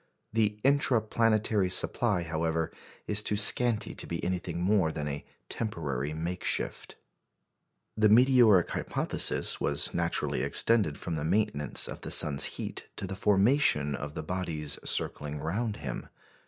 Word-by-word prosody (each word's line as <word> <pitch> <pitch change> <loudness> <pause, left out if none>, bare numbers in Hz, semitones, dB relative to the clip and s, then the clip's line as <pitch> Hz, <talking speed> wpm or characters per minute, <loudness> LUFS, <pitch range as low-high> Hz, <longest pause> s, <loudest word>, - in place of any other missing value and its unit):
The 105 -2 0
"intra 135 -3 +3
planetary" 110 -3 0
supply, 100 0 +1
however, 80 0 -2 0.3
is 105 0 +1
too 105 0 -2
scanty 115 +1 +3
to - - -4
be 85 - -5
anything 90 -2 -3
more 90 -2 +1
than 75 -2 -5
a 70 0 -5 0.2
temporary 75 - -4
makeshift. 85 +4 -3 1.0
The 110 0 +3
meteoric 115 -5 +5
hypothesis - - +1
was 70 0 +1
naturally 85 -1 -1
extended 105 -11 +2
from 85 - -5
the 75 -2 -3
maintenance 80 -4 +1
of - - -8
the - - -7
sun's 70 -2 +4
heat - - -6
to - - -5
the 95 +1 -6
formation 100 - +2
of 75 +2 -6
the - - -5
bodies 80 -4 -4
circling 75 0 -2
round 105 +8 -3
him. 65 -5 -7
90 Hz, 140 wpm, -28 LUFS, 80-110 Hz, 1.0 s, meteoric